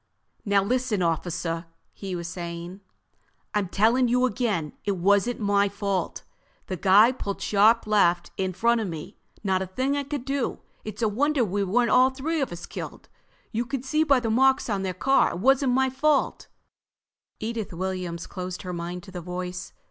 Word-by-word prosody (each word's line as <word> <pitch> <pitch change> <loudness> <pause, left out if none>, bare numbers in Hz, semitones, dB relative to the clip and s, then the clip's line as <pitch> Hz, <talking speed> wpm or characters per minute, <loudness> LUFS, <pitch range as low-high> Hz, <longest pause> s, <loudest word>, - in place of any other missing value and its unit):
"Now 200 -1 +3
listen, 235 -3 0
officer," 165 0 -2 0.3
he 190 -2 -5
was 170 -1 -4
saying, 170 +2 -6 0.7
"I'm 205 -3 0
telling 230 +6 +3
you 250 +2 +3
again, 205 - -1
it 200 -2 -1
wasn't 200 +6 +2
my 200 -1 +2
fault. 200 -2 -2 0.4
The 185 - -4
guy 200 +6 +6
pulled 205 -6 -5
sharp 215 +3 +4
left 180 -5 +2
right 190 - -1
in 185 - -3
front 230 +5 +2
of 215 - -2
me. 160 -3 -7 0.2
Not 190 -2 +1
a 190 - -3
thing 260 +9 -1
I 285 - -1
could 280 -2 -5
do. 275 -2 -2 0.2
It's 215 +1 -5
a - - +4
wonder 270 +4 +1
we 200 +1 -1
weren't 235 +5 +2
all 255 +1 +6
three 290 +4 -2
of 270 - -1
us 175 0 -7
killed. - - -8 0.4
You 230 +1 0
can 265 +1 -4
see 305 +4 +1
by 280 -4 +4
the 230 -2 -1
marks 265 0 +3
on 200 -1 0
their 185 -2 -3
car 270 +9 +3
it - - -4
wasn't 270 +3 +3
my 265 0 +2
fault—" 285 +2 +1 0.9
Edith 225 -1 -4
Williams 180 -1 -4
closed 180 0 -6
her 180 -1 -5
mind 175 +1 -5
to 195 - -12
the 180 -1 -6
voice. 180 +1 -5
205 Hz, 185 wpm, -26 LUFS, 180-250 Hz, 0.9 s, guy